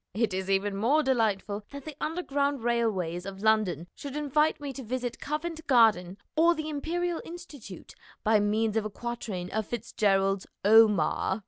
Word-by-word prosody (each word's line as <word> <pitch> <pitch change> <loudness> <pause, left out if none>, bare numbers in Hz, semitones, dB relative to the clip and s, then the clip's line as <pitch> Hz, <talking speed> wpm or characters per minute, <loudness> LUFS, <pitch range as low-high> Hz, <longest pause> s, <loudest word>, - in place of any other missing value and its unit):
It 220 -2 +1
is 190 +1 -3
even 195 +1 +1
more 260 +10 +2
delightful 215 -5 0
that 280 -1 -9
the 310 -2 -7
Underground 285 -5 -1
Railways 205 -8 0
of 195 +1 -8
London 215 -7 +2
should 280 -1 -8
invite 300 +1 +1
me 285 -2 -5
to 270 - -7
visit 245 0 -4
Covent 315 +2 -4
Garden 210 -8 +4 0.2
or 335 +2 +4
the 310 -1 -4
Imperial 335 +3 -2
Institute 295 - -10 0.3
by 215 0 +4
means 215 +1 +1
of 220 - +1
a - - -2
quatrain 215 -5 -5
of 215 0 -2
FitzGerald's 195 -4 0 0.2
"Omar." 210 -3 +4
225 Hz, 155 wpm, -28 LUFS, 200-285 Hz, 0.3 s, Garden